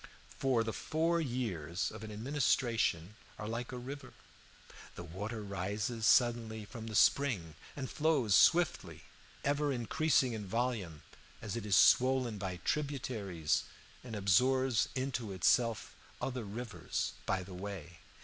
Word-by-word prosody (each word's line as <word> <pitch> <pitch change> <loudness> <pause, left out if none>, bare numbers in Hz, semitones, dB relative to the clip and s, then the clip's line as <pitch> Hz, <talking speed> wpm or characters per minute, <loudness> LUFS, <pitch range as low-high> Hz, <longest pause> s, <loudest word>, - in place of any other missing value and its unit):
For 130 -4 +2
the 110 -1 -3
four 165 +2 0
years 110 - -2
of 110 0 -9
an 110 - -7
administration 115 - 0 0.2
are 105 - -5
like 115 +3 -4
a 125 - -5
river. 130 +1 -8 0.8
The 85 - -7
water 105 +6 -5
rises 105 +4 -2
suddenly 115 -3 +3
from 115 +1 -8
the 110 - -5
spring 105 - +3 0.2
and 135 -2 -4
flows 145 -10 +1
swiftly, 170 - +3 0.4
ever 145 +1 +1
increasing 130 +1 +2
in 105 -3 -5
volume 105 -9 -2 0.4
as 105 0 -5
it 115 -3 -4
is 100 - +3
swollen 130 -4 +4
by 95 -2 -3
tributaries 120 - -1 0.4
and 120 -3 -7
absorbs 125 +5 +3
into 125 -6 -2
itself 115 +5 +2 0.3
other 125 -3 -3
rivers 115 +4 -4
by 95 - 0
the 95 +1 -10
way. 90 -3 -7
115 Hz, 130 wpm, -33 LUFS, 100-130 Hz, 0.8 s, swollen